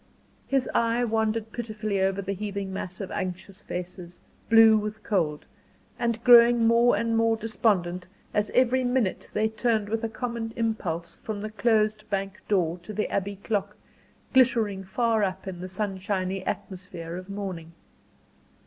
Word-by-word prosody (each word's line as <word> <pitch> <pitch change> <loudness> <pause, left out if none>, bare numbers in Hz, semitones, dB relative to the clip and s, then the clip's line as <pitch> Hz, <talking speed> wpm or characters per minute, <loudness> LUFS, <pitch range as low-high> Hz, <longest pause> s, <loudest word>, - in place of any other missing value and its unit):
His 270 -1 +1
eye 235 +1 +2
wandered 220 -1 0
pitifully 215 -4 -3
over 195 +1 +1
the 195 +1 -2
heaving 200 -1 -4
mass 185 +1 -5
of 190 - -6
anxious 185 0 -5
faces 180 0 -7 0.3
blue 225 -1 +8
with 215 +1 -3
cold, 160 -8 0 0.5
and 235 -1 -1
growing 240 -1 +7
more 235 +1 +5
and 230 0 0
more 225 0 +3
despondent 185 -5 0 0.3
as 210 0 +1
every 255 +1 +3
minute 245 -6 0
they 215 +1 +1
turned 220 -1 0
with 225 +1 -2
a 225 - -1
common 230 -1 -4
impulse 190 -8 -2
from 215 -2 -5
the 215 0 -5
closed 215 -1 +1
bank 195 0 -3
door 180 -4 +1
to 175 +5 -9
the 210 +1 -2
Abbey 200 +1 -1
clock, 205 -2 -2 0.6
glittering 230 -7 +3
far 220 +3 +1
up 190 0 -3
in 180 -2 -6
the 185 - -6
sunshiny 190 -1 -2
atmosphere 180 -4 -5
of 185 +2 -8
morning. 185 -5 -6
210 Hz, 150 wpm, -26 LUFS, 190-225 Hz, 0.6 s, blue